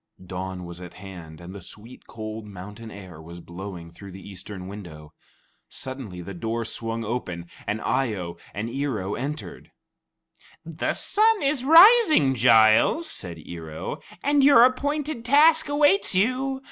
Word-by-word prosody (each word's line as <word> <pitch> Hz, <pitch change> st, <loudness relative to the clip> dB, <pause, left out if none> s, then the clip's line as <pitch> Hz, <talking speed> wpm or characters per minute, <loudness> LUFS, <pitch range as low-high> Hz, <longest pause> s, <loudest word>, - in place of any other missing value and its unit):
Dawn 90 Hz, 0 st, -6 dB
was 85 Hz, +1 st, -9 dB
at 90 Hz, -, -10 dB
hand, 90 Hz, -5 st, -11 dB
and 90 Hz, +2 st, -10 dB
the 100 Hz, -, -9 dB
sweet, 110 Hz, +7 st, -13 dB
cold 110 Hz, -1 st, -7 dB
mountain 105 Hz, +3 st, -10 dB
air 95 Hz, -6 st, -11 dB
was 85 Hz, +2 st, -11 dB
blowing 85 Hz, -1 st, -9 dB
through 100 Hz, +3 st, -12 dB
the 95 Hz, +2 st, -11 dB
eastern 95 Hz, -1 st, -8 dB
window. 85 Hz, -7 st, -10 dB, 0.6 s
Suddenly, 130 Hz, -9 st, -7 dB
the 100 Hz, +3 st, -8 dB
door 115 Hz, +5 st, -3 dB
swung 115 Hz, 0 st, -4 dB
open, 90 Hz, -7 st, -4 dB, 0.2 s
and 105 Hz, -, -1 dB
Eye 125 Hz, -5 st, 0 dB
o 85 Hz, -3 st, -6 dB
and 105 Hz, +3 st, -4 dB
Ear 135 Hz, -1 st, -2 dB
o 95 Hz, +2 st, -4 dB
entered. 145 Hz, +4 st, -6 dB, 1.0 s
"The -, -, -2 dB
sun 435 Hz, -2 st, +2 dB
is 275 Hz, -2 st, 0 dB
rising, 325 Hz, -, +7 dB
Giles," 115 Hz, -, +4 dB
said 85 Hz, -3 st, -7 dB
Ear 80 Hz, -2 st, -8 dB
o, 80 Hz, -, -6 dB, 0.2 s
"and 285 Hz, -1 st, +3 dB
your 270 Hz, -4 st, +7 dB
appointed 285 Hz, +1 st, 0 dB
task 305 Hz, +5 st, +4 dB
awaits 290 Hz, -, +3 dB
you. 255 Hz, +7 st, 0 dB
110 Hz, 150 wpm, -24 LUFS, -, 1.0 s, rising